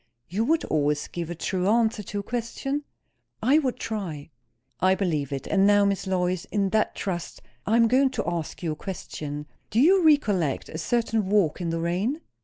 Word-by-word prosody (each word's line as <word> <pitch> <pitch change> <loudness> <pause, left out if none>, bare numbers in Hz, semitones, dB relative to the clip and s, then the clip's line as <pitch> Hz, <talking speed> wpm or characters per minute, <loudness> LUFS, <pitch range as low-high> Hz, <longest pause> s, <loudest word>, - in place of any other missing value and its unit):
"You 205 +6 -1
would 320 +4 +2
always 150 -1 0
give 170 -2 -5
a 175 - -4
true 185 +2 -1
answer 220 0 +2
to 205 +1 -5
a - - -14
question?" 245 +6 -3 0.5
"I 270 +7 +4
would 260 -5 -1
try." 170 -9 -5 0.5
"I 185 +1 +4
believe 155 -8 -1
it. 135 -1 -4
And 195 0 +3
now, 205 0 +5
Miss 200 -1 0
Lois, 180 -1 0
in 200 -2 0
that 215 +2 +1
trust, 175 -6 -4 0.2
I 220 - +3
am 230 -1 +5
going 265 +3 +4
to - - +1
ask 170 0 -3
you 165 - 0
a - - -3
question. 150 -4 -6 0.2
Do 220 - +1
you 360 +7 +5
recollect 205 - +2
a 160 - -6
certain 225 +2 0
walk 190 -5 +2
in 170 - -1
the 165 0 -1
rain?" 185 - -1
195 Hz, 195 wpm, -26 LUFS, 170-230 Hz, 0.5 s, now